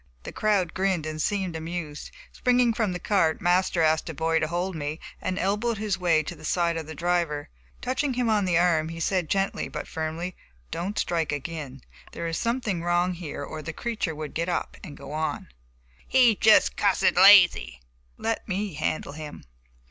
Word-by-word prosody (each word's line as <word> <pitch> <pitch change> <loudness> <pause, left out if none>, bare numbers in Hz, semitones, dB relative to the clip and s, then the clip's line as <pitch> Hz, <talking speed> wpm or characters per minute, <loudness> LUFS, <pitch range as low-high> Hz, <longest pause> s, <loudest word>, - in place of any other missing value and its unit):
The - - -7
crowd 200 -5 +1
grinned 185 -4 0
and 155 0 -4
seemed 190 -3 -1
amused. 160 -2 -5 0.2
Springing 245 -1 +2
from 220 -4 0
the 180 - -3
cart, 170 -5 +1
Master 175 -1 +2
asked 160 +1 +2
a 160 - -6
boy 160 +2 +1
to 155 - 0
hold 175 +3 -2
me, 150 +1 -4 0.2
and 185 0 -2
elbowed 210 +5 0
his 205 -2 -2
way 165 -3 +3
to 175 - -6
the - - -15
side 170 +1 +1
of 160 -2 -5
the 160 - -7
driver. 170 -3 -1 0.3
Touching 265 +1 -1
him 250 -1 0
on 210 -3 +2
the 175 -2 +2
arm, 165 -2 +2
he 165 0 -7
said 180 -1 0
gently, 195 0 0
but - - -6
firmly: 160 +3 -4 0.4
"Don't 185 +5 -3
strike 165 -4 0
again; 145 -3 -6 0.3
there 170 - -5
is 165 -1 -2
something 230 -7 -1
wrong 175 +1 +1
here 165 -5 -6
or 155 +2 -6
the 160 +2 -6
creature 215 -5 -3
would 155 0 -6
get 170 +2 -2
up 175 - -2
and 145 -6 -9
go 140 0 -10
on." 155 +1 -3 0.6
"He's 250 -4 +5
jest 220 0 +5
cussed 200 -2 +3
lazy!" 175 - +7 0.4
"Let 225 0 -2
me 200 -1 -2
handle 155 0 -2
him." 150 0 -9
175 Hz, 185 wpm, -26 LUFS, 160-195 Hz, 0.6 s, lazy